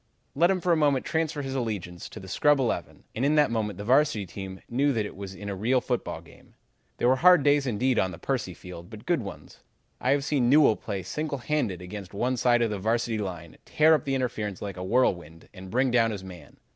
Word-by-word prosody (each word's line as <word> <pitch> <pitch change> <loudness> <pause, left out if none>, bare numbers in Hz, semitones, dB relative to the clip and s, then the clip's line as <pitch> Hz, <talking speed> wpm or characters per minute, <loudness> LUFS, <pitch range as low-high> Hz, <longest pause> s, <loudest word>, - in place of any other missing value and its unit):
"Let 170 +5 +3
him 190 -2 +1
for 180 - +1
a - - +5
moment 145 -4 +2
transfer 160 -2 -1
his 135 0 -4
allegiance 105 -9 -4
to - - -9
the 95 - -11
scrub 145 +10 +3
eleven, 130 -4 -2
and 120 - -3
in 145 +2 +3
that 150 -5 +4
moment 105 -4 -2
the 100 - -6
Varsity 125 -3 +2
team 95 +1 -8
knew 140 +4 +1
that 110 -3 -1
it - - -8
was 95 0 -8
in 100 +1 -8
a 100 - -2
real 120 +7 +2
football 125 -1 -3
game. - - -19 0.4
They - - -1
were 130 +2 +4
hard 180 0 +6
days 145 -1 +3
indeed 125 +2 +1
on 95 - +1
Percy 105 -3 -3
Field, 90 0 -10
but 110 -1 -11
good 170 -7 +1
days. 100 - -10 0.4
I - - -1
have 140 0 +2
seen 135 -5 +1
Newell 145 -5 +6
play 95 -2 -5
single 150 - -3
handed 120 - -2
against 100 +1 -8
one 125 +5 0
side 120 -1 +3
of 115 - 0
the 105 - -3
Varsity 115 +2 0
line, 85 -5 -6
tear 155 +1 +4
up 150 - +1
the 135 -1 0
interference 110 -6 -3
like 100 -2 -5
a 90 - -6
whirlwind, 90 -7 0
and 95 -1 -10
bring 130 +4 +1
down 115 -2 +3
his 100 -3 -5
man. 90 -6 -12
120 Hz, 235 wpm, -27 LUFS, 95-140 Hz, 0.4 s, hard